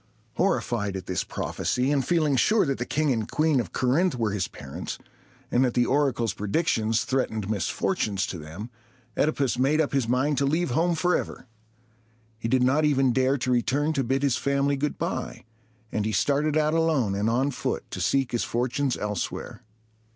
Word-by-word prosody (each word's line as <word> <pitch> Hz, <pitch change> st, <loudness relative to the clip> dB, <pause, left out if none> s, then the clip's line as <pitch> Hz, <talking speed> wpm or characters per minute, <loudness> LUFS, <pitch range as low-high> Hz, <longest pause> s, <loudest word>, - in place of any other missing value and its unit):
Horrified 115 Hz, -, 0 dB
at 95 Hz, -1 st, -5 dB
this 90 Hz, -, -1 dB
prophecy, 125 Hz, +3 st, -1 dB
and 140 Hz, -2 st, +2 dB
feeling 155 Hz, -1 st, +2 dB
sure 210 Hz, -, +3 dB
that 135 Hz, -2 st, -2 dB
the 120 Hz, -, -3 dB
King 150 Hz, -1 st, +1 dB
and 110 Hz, -4 st, -1 dB
Queen 155 Hz, -3 st, +2 dB
of 105 Hz, -8 st, -3 dB
Corinth 145 Hz, +7 st, +1 dB
were 115 Hz, -4 st, 0 dB
his 100 Hz, -3 st, -1 dB
parents, 70 Hz, -1 st, -7 dB, 0.5 s
and 125 Hz, -, +3 dB
that 125 Hz, -2 st, 0 dB
the 120 Hz, -, +3 dB
oracle's 130 Hz, -6 st, +1 dB
predictions 110 Hz, -, 0 dB
threatened 110 Hz, -6 st, -1 dB
misfortunes 100 Hz, -, -1 dB
to 90 Hz, -, -6 dB
them, 85 Hz, +10 st, -8 dB, 0.4 s
OEdipus 140 Hz, -5 st, +1 dB
made 140 Hz, +4 st, +3 dB
up 155 Hz, -2 st, +1 dB
his 135 Hz, -4 st, +1 dB
mind 130 Hz, +3 st, +1 dB
to 140 Hz, -, +2 dB
leave 160 Hz, 0 st, 0 dB
home 170 Hz, +6 st, +2 dB
forever. 175 Hz, -4 st, -1 dB, 0.9 s
He 115 Hz, -, -3 dB
did 125 Hz, +2 st, +2 dB
not 140 Hz, +5 st, +3 dB
even 135 Hz, -4 st, +3 dB
dare 130 Hz, +2 st, +2 dB
to 125 Hz, 0 st, -1 dB
return 140 Hz, +5 st, +1 dB
to 140 Hz, -, 0 dB
bid 135 Hz, +3 st, 0 dB
his 135 Hz, -4 st, +2 dB
family 140 Hz, 0 st, +1 dB
good 145 Hz, +2 st, -2 dB
by, -, -, -4 dB, 0.5 s
and 105 Hz, -, -1 dB
he 110 Hz, +1 st, -1 dB
started 145 Hz, +4 st, +1 dB
out 155 Hz, 0 st, +2 dB
alone 155 Hz, -11 st, +2 dB
and 100 Hz, +3 st, 0 dB
on 130 Hz, +5 st, +1 dB
foot 125 Hz, -, -3 dB
to -, -, -4 dB
seek 135 Hz, -2 st, +1 dB
his 120 Hz, -, 0 dB
fortunes 125 Hz, +2 st, -1 dB
elsewhere. 105 Hz, -1 st, -4 dB
130 Hz, 180 wpm, -26 LUFS, 115-145 Hz, 0.9 s, sure